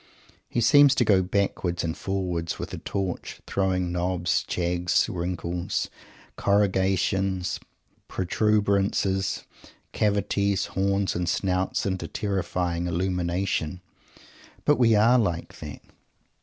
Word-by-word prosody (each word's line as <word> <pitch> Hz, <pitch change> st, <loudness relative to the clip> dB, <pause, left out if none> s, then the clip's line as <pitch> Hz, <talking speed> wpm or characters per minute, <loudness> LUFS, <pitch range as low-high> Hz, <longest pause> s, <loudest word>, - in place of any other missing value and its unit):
He 120 Hz, -, 0 dB
seems 145 Hz, +3 st, +6 dB
to 120 Hz, -, +3 dB
go 100 Hz, -3 st, +5 dB
backwards 90 Hz, -2 st, -1 dB
and 80 Hz, -1 st, -2 dB
forwards 90 Hz, -4 st, -2 dB
with -, -, -6 dB
a -, -, -4 dB
torch, 95 Hz, -3 st, -4 dB
throwing 90 Hz, -2 st, 0 dB
knobs, 90 Hz, 0 st, 0 dB
jags, 90 Hz, 0 st, +1 dB
wrinkles, 85 Hz, 0 st, -3 dB, 0.5 s
corrugations, 95 Hz, -1 st, +1 dB, 0.5 s
protuberancies, 100 Hz, -1 st, +1 dB, 0.5 s
cavities, 100 Hz, -1 st, +1 dB
horns, 100 Hz, 0 st, +1 dB
and 90 Hz, 0 st, -1 dB
snouts 95 Hz, -1 st, 0 dB
into 95 Hz, -4 st, -2 dB
terrifying 90 Hz, -3 st, -2 dB
illumination. 90 Hz, -1 st, -1 dB, 0.9 s
But 145 Hz, -, +4 dB
we 115 Hz, -3 st, +5 dB
are 115 Hz, +4 st, +5 dB
like 85 Hz, -7 st, -2 dB
that! -, -, -8 dB
95 Hz, 100 wpm, -26 LUFS, 90-100 Hz, 0.9 s, seems